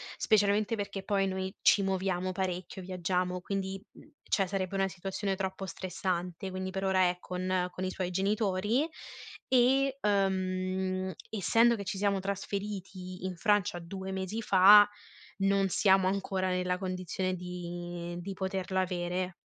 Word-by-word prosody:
specialmente 210 Hz, 0 st, +2 dB
perché 200 Hz, -2 st, -4 dB
poi 195 Hz, 0 st, +1 dB
noi 190 Hz, +1 st, -3 dB
ci 205 Hz, -, +6 dB
muoviamo 185 Hz, -1 st, -1 dB
parecchio, 185 Hz, 0 st, -3 dB
viaggiamo, 180 Hz, 0 st, -1 dB
quindi, 195 Hz, +1 st, -3 dB
mhmm, 300 Hz, -, -17 dB
cioè 195 Hz, -, +1 dB
sarebbe 190 Hz, 0 st, -3 dB
una 195 Hz, 0 st, +2 dB
situazione 195 Hz, +1 st, -3 dB
troppo 190 Hz, 0 st, -3 dB
stressante, 180 Hz, 0 st, -3 dB
quindi 185 Hz, 0 st, -3 dB
per 190 Hz, +1 st, -4 dB
ora 185 Hz, -1 st, +3 dB
è 180 Hz, -, -3 dB
con 180 Hz, 0 st, -1 dB
con 185 Hz, -, -5 dB
i 185 Hz, -, 0 dB
suoi 185 Hz, -1 st, -3 dB
genitori 205 Hz, -, +1 dB, 0.6 s
e, 265 Hz, +2 st, +3 dB
ehm, 185 Hz, -2 st, 0 dB, 0.2 s
essendo 230 Hz, +3 st, +4 dB
che 200 Hz, -, -5 dB
ci 195 Hz, -, -4 dB
siamo 200 Hz, 0 st, +1 dB
trasferiti 190 Hz, -2 st, -5 dB
in 185 Hz, -1 st, -3 dB
Francia 205 Hz, -3 st, +2 dB
2 190 Hz, +3 st, -6 dB
mesi 190 Hz, +4 st, -3 dB
fa, 205 Hz, +2 st, +8 dB, 0.5 s
non 195 Hz, 0 st, +3 dB
siamo 190 Hz, +1 st, +4 dB
ancora 190 Hz, -1 st, -1 dB
nella 180 Hz, 0 st, 0 dB
condizione 185 Hz, 0 st, -2 dB
di 175 Hz, -1 st, -6 dB
di 195 Hz, +3 st, -5 dB
poterla 190 Hz, 0 st, -1 dB
avere. 180 Hz, 0 st, -2 dB
190 Hz, 140 wpm, -30 LUFS, 185-195 Hz, 0.6 s, fa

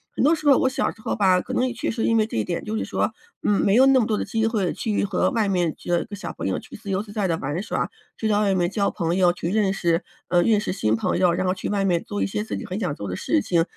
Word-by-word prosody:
很 -, -, 0 dB
多 305 Hz, -, +5 dB
时 310 Hz, -, -9 dB
候 270 Hz, -, +7 dB
我 260 Hz, -, +3 dB
小 260 Hz, -, 0 dB
时 220 Hz, -, -17 dB
候 -, -, -2 dB
吧， 185 Hz, -3 st, +4 dB
可 -, -, -6 dB
能 255 Hz, -, +2 dB
也 245 Hz, -, -3 dB
确 225 Hz, -, -3 dB
实 225 Hz, 0 st, -4 dB
是 -, -, +2 dB
因 230 Hz, -, +3 dB
为 215 Hz, -, +3 dB
这 220 Hz, -, -7 dB
一 110 Hz, -, +1 dB
点， 170 Hz, -, -4 dB
就 215 Hz, -, -3 dB
是 -, -, -1 dB
说， 225 Hz, -, -1 dB, 0.3 s
嗯， 205 Hz, -, +2 dB
没 195 Hz, -, +3 dB
有 260 Hz, +3 st, +7 dB
那 270 Hz, -1 st, +5 dB
么 -, -, +1 dB
多 215 Hz, -2 st, 0 dB
的 -, -, -2 dB
机 225 Hz, 0 st, 0 dB
会 210 Hz, -6 st, 0 dB
去 210 Hz, -3 st, -1 dB
和 -, -, +1 dB
外 225 Hz, -5 st, 0 dB
面 175 Hz, -5 st, +1 dB
就 175 Hz, -1 st, -1 dB
小 205 Hz, -, -6 dB
朋 -, -, -4 dB
友 -, -, -1 dB
去 -, -, -12 dB
自 200 Hz, -, -9 dB
由 195 Hz, +1 st, 0 dB
自 205 Hz, -1 st, -12 dB
在 205 Hz, -3 st, 0 dB
地 165 Hz, -, +1 dB
玩 145 Hz, +6 st, -3 dB
耍， -, -, -2 dB, 0.3 s
就 220 Hz, -, -1 dB
在 205 Hz, -1 st, +2 dB
外 200 Hz, -2 st, +2 dB
面 175 Hz, -1 st, +1 dB
交 200 Hz, -2 st, 0 dB
朋 170 Hz, -2 st, -1 dB
友， 180 Hz, -2 st, +4 dB
去 175 Hz, -1 st, -4 dB
认 205 Hz, -3 st, +2 dB
识 170 Hz, -3 st, 0 dB, 0.2 s
呃， 175 Hz, -1 st, +3 dB
认 215 Hz, +2 st, +3 dB
识 195 Hz, -, -2 dB
新 110 Hz, -, +1 dB
朋 -, -, 0 dB
友， 180 Hz, -2 st, +4 dB
然 185 Hz, -, -1 dB
后 185 Hz, -, +2 dB
去 185 Hz, -, -5 dB
外 200 Hz, -1 st, 0 dB
面 175 Hz, -3 st, +1 dB
做 100 Hz, -1 st, -4 dB
一 -, -, 0 dB
些 105 Hz, +2 st, -2 dB
自 100 Hz, -2 st, -4 dB
己 -, -, -6 dB
很 185 Hz, -, -4 dB
想 180 Hz, -8 st, -1 dB
做 100 Hz, -, -6 dB
的 90 Hz, -, -3 dB
事 100 Hz, -, +1 dB
情， 165 Hz, -, +2 dB
195 Hz, 350 characters per minute, -23 LUFS, 175-220 Hz, 0.3 s, 候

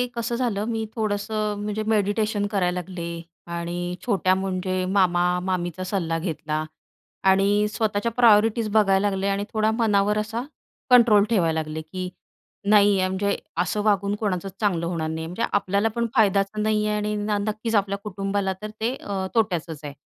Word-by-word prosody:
कसं 235 Hz, 0 st, -2 dB
झालं 230 Hz, -4 st, -1 dB
मी 225 Hz, -1 st, -2 dB
थोडंसं 210 Hz, -1 st, -2 dB
म्हणजे 210 Hz, +1 st, -2 dB
मेडिटेशन 205 Hz, 0 st, +1 dB
करायला 180 Hz, -3 st, 0 dB
लागले 180 Hz, -1 st, -6 dB, 0.5 s
आणि 175 Hz, +1 st, -3 dB
छोट्या 190 Hz, -5 st, +2 dB
म्हणजे 185 Hz, -1 st, -2 dB
मामा-मामीचा 180 Hz, -1 st, +1 dB
सल्ला 170 Hz, -4 st, -1 dB
घेतला 155 Hz, -2 st, -3 dB, 0.7 s
आणि 200 Hz, +2 st, +3 dB
स्वतःच्या 220 Hz, 0 st, 0 dB
प्रायोरिटीज 225 Hz, -1 st, +4 dB
बघायला 205 Hz, -2 st, +4 dB
लागले 195 Hz, 0 st, -2 dB
आणि 200 Hz, 0 st, 0 dB
थोडा 215 Hz, 0 st, +2 dB
मनावर 210 Hz, -2 st, +2 dB
असा 225 Hz, +3 st, -2 dB, 0.5 s
कंट्रोल 235 Hz, -5 st, +7 dB
ठेवायला 165 Hz, -8 st, +2 dB
लागले 155 Hz, 0 st, -4 dB
की 180 Hz, +3 st, -6 dB, 0.6 s
नाही 205 Hz, -1 st, +5 dB
आहे 185 Hz, -, +2 dB
म्हणजे 200 Hz, +2 st, 0 dB, 0.2 s
असं 180 Hz, +4 st, 0 dB
वागून 200 Hz, -1 st, +2 dB
कोणाचं 195 Hz, -3 st, -2 dB
चांगलं 180 Hz, -6 st, +1 dB
होणार 165 Hz, -2 st, -2 dB
नाही, 160 Hz, 0 st, -4 dB
म्हणजे 180 Hz, +7 st, -3 dB
आपल्याला 200 Hz, +1 st, +1 dB
पण 235 Hz, 0 st, 0 dB
फायद्याचं 205 Hz, -1 st, +2 dB
नाही 215 Hz, -1 st, +1 dB
आहे 210 Hz, -, 0 dB
आणि 210 Hz, 0 st, -1 dB, 0.3 s
नक्कीच 220 Hz, +2 st, -2 dB
आपल्या 200 Hz, -1 st, +1 dB
कुटुंबाला 195 Hz, -1 st, -2 dB
तर 215 Hz, -, -5 dB
ते 235 Hz, +3 st, +1 dB
अ, 195 Hz, -6 st, -4 dB
तोट्याचच 175 Hz, -8 st, 0 dB
आहे. 145 Hz, -1 st, -6 dB
200 Hz, 150 wpm, -24 LUFS, 185-215 Hz, 0.7 s, कंट्रोल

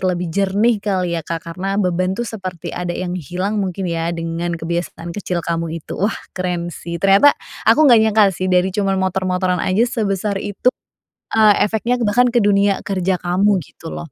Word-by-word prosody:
lebih 180 Hz, -2 st, -1 dB
jernih 200 Hz, +4 st, +2 dB
kali 185 Hz, -4 st, -1 dB
ya 170 Hz, -, -1 dB
Kak, 165 Hz, +1 st, -5 dB
karena 195 Hz, +3 st, -3 dB
beban 185 Hz, -1 st, 0 dB
tuh 240 Hz, -, -2 dB
seperti 185 Hz, -7 st, -6 dB
ada 175 Hz, -1 st, -3 dB
yang 180 Hz, -1 st, -3 dB
hilang 185 Hz, +6 st, -2 dB
mungkin 190 Hz, 0 st, -3 dB
ya 165 Hz, -1 st, -2 dB
dengan 165 Hz, +1 st, -3 dB
kebiasaan 170 Hz, 0 st, -4 dB
kecil 180 Hz, -3 st, -3 dB
kamu 165 Hz, -1 st, -2 dB
itu. -, -, -7 dB
Wah, 205 Hz, +4 st, +1 dB, 0.2 s
keren 175 Hz, -2 st, -3 dB
sih. 170 Hz, +1 st, -6 dB
Ternyata 195 Hz, -, +5 dB, 0.3 s
aku 310 Hz, -, +6 dB
enggak 240 Hz, -6 st, +7 dB
nyangka 220 Hz, -1 st, +4 dB
sih 185 Hz, +1 st, -3 dB
dari 180 Hz, +1 st, +2 dB
cuma 195 Hz, -1 st, 0 dB
motor-motoran 185 Hz, -1 st, 0 dB
aja 200 Hz, +6 st, +2 dB
sebesar 205 Hz, -4 st, -1 dB
itu, 205 Hz, +5 st, 0 dB, 0.6 s
eee, 215 Hz, -1 st, +6 dB
efeknya 225 Hz, +4 st, 0 dB
bahkan 245 Hz, +4 st, +3 dB
ke 240 Hz, -, 0 dB
dunia 200 Hz, -1 st, +3 dB
kerja 190 Hz, -1 st, 0 dB
kamu 190 Hz, +3 st, +2 dB
gitu 165 Hz, -, -11 dB
loh. -, -, -6 dB
185 Hz, 180 wpm, -19 LUFS, 175-205 Hz, 0.6 s, enggak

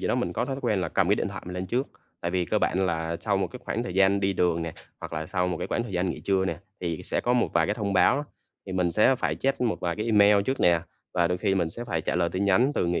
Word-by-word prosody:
gì -, -, -2 dB
đó, -, -, +2 dB
mình -, -, -1 dB
có -, -, -1 dB
thói 135 Hz, -, -3 dB
quen 110 Hz, -7 st, +1 dB
là 90 Hz, -, -1 dB
cầm 95 Hz, +2 st, +1 dB
cái 100 Hz, -, +5 dB
điện -, -, -2 dB
thoại 100 Hz, -1 st, -7 dB
mình 90 Hz, -, -6 dB
lên 90 Hz, +1 st, -3 dB
trước, 125 Hz, +7 st, -1 dB, 0.3 s
tại 85 Hz, -, -2 dB
vì 90 Hz, 0 st, 0 dB
cơ -, -, 0 dB
bản 95 Hz, +1 st, +1 dB
là 80 Hz, -1 st, -2 dB
sau 100 Hz, -2 st, 0 dB
một 95 Hz, -1 st, 0 dB
cái 125 Hz, +6 st, -10 dB
khoảng 115 Hz, -, -2 dB
thời 95 Hz, -7 st, -5 dB
gian 95 Hz, +1 st, +4 dB
đi 95 Hz, 0 st, +1 dB
đường 85 Hz, -3 st, +1 dB
nè 80 Hz, -, -4 dB, 0.3 s
hoặc -, -, -7 dB
là 80 Hz, 0 st, -3 dB
sau 90 Hz, +2 st, 0 dB
một 90 Hz, -, -2 dB
cái 90 Hz, -, -3 dB
khoảng -, -, -1 dB
thời 120 Hz, -4 st, -7 dB
gian 90 Hz, 0 st, 0 dB
nghỉ -, -, -6 dB
trưa 95 Hz, -1 st, +1 dB
nè, -, -, -2 dB, 0.2 s
thì 85 Hz, -3 st, -3 dB
sẽ -, -, -1 dB
có 120 Hz, -, +1 dB
một 125 Hz, -1 st, +2 dB
vài 80 Hz, -1 st, +3 dB
cái 105 Hz, -, 0 dB
thông 105 Hz, -2 st, -2 dB
báo 95 Hz, +5 st, +4 dB
đó. 145 Hz, -, -2 dB, 0.4 s
Thì 95 Hz, -, -5 dB
mình 90 Hz, -2 st, +1 dB
sẽ 105 Hz, +9 st, +4 dB
phải 130 Hz, -, -1 dB
check 135 Hz, 0 st, -1 dB
một 110 Hz, -9 st, 0 dB
vài 85 Hz, -2 st, -2 dB
cái 110 Hz, +2 st, -3 dB
email 105 Hz, -2 st, +5 dB
trước 130 Hz, +6 st, -2 dB
nè 85 Hz, -1 st, +4 dB, 0.3 s
và 85 Hz, -1 st, +3 dB
đôi 90 Hz, -, -1 dB
khi 95 Hz, +1 st, +1 dB
mình 85 Hz, -4 st, 0 dB
sẽ 120 Hz, +8 st, -7 dB
phải 85 Hz, -9 st, -2 dB
trả -, -, -2 dB
lời 85 Hz, -1 st, +2 dB
tin 95 Hz, +3 st, -2 dB
nhắn 120 Hz, +8 st, +3 dB
từ -, -, +1 dB
người 85 Hz, 0 st, 0 dB
95 Hz, 330 wpm, -26 LUFS, 85-105 Hz, 0.4 s, cái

